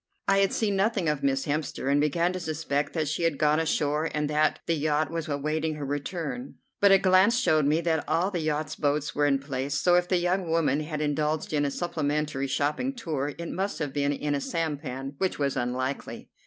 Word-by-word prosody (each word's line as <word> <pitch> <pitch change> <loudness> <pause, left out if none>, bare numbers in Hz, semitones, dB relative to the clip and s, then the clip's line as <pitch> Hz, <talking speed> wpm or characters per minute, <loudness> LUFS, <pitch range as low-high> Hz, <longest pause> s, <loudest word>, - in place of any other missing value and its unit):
I 195 0 +4
had 195 -1 +3
seen 205 -3 0
nothing 195 -2 +1
of 150 -2 0
Miss 135 -1 +1
Hemster, 145 -2 -2
and 145 +1 +3
began 170 +4 +1
to 185 - -3
suspect 155 -3 -2
that 155 -3 -1
she 155 +4 -2
had 165 -4 +1
gone 150 +1 +3
ashore 155 0 0
and 150 -1 0
that 155 +1 +2
the 170 - +1
yacht 155 0 0
was 165 -1 -3
awaiting 155 +2 -1
her 145 -1 -5
return; 160 - -4 0.2
but 200 -1 +6
a 195 - +8
glance 190 +5 +4
showed 155 - +3
me 155 +3 +2
that 160 -2 0
all 170 +5 +1
the 180 - -2
yacht's 155 -1 -2
boats 145 0 0
were 145 0 +2
in 140 -1 +3
place, 135 0 -3
so 175 +4 +3
if 180 0 +3
the 185 - +2
young 175 0 0
woman 155 -4 +2
had 155 0 -4
indulged 150 +1 -1
in 145 -1 +2
a - - +1
supplementary 150 -3 -2
shopping 150 - -1
tour 150 - -3
it 170 0 -5
must 195 +2 -2
have 145 -4 -3
been 145 -1 +1
in 145 +1 -2
a 140 - -1
sampan, 145 -5 -3
which 190 -1 0
was 140 -2 0
unlikely. 130 +2 -3
150 Hz, 215 wpm, -27 LUFS, 145-170 Hz, 0.2 s, a